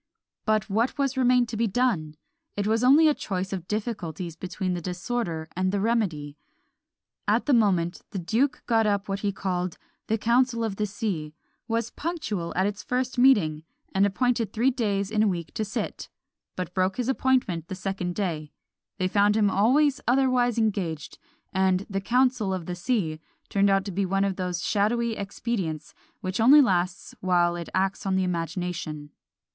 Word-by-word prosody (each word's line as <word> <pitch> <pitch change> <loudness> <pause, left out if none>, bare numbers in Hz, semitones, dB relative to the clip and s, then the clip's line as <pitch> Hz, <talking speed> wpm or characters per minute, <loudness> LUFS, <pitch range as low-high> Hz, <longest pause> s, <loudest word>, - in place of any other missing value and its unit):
But 215 0 +1
what 225 +7 0 0.2
remained 250 -1 +3
to 230 - -4
be 230 +1 +2
done? 195 -9 0 0.4
It 205 - 0
was 225 +2 +1
only 290 +5 +7
a 305 - +5
choice 190 -6 -4
of 180 -2 -5
difficulties 185 -7 -4
between 185 +1 -3
the 175 - -3
disorder 175 -2 -3
and 185 +1 +1
the 200 - 0
remedy. 175 -10 -1 0.9
At - - +2
the 290 - +3
moment, 185 -7 +2
the - - -6
duke 230 +10 0
got 225 -2 +3
up 200 -1 0
what 195 0 -2
he 200 0 0
called 180 -2 -3 0.3
"The 220 - +1
council 235 +1 +2
of 210 -3 -2
the 210 - 0
sea;" 185 -8 -4 0.3
was 230 0 -1
punctual 290 - -3
at 185 - +2
its 205 0 -2
first 250 0 -2
meeting, 195 -13 +4 0.3
and 195 - +3
appointed 230 0 0
three 240 +5 +2
days 205 -5 -1
in 215 -1 +2
a 215 - +4
week 170 -5 -3
to 220 - -2
sit 210 0 -4 0.5
but 180 -1 -4
broke 185 0 0
his 250 -1 -1
appointment 250 -11 +1
the 190 - -5
second 185 -2 -3
day 160 -7 -3 0.5
they 185 -2 +1
found 205 +2 +3
him 205 -2 +3
always 270 +8 +3
otherwise 250 -2 +3
engaged; 195 -9 -2 0.3
and 190 0 +2
"the 195 -1 -3
council 245 -3 +2
of 180 -3 -6
the 180 - -4
sea" 175 -5 -1 0.3
turned 200 0 +3
out 195 0 +2
to 200 - -4
be 195 +1 -1
one 195 +1 +1
of 195 -1 0
those 180 -2 -3
shadowy 225 +3 +1
expedients 195 -6 -4 0.3
which 185 +2 -3
only 265 +7 +8
lasts 185 -8 +1
while 175 -2 +2
it 170 -1 -6
acts 190 +1 0
on 190 - +1
the 190 - +2
imagination. 170 -3 -3
200 Hz, 175 wpm, -26 LUFS, 180-230 Hz, 0.9 s, only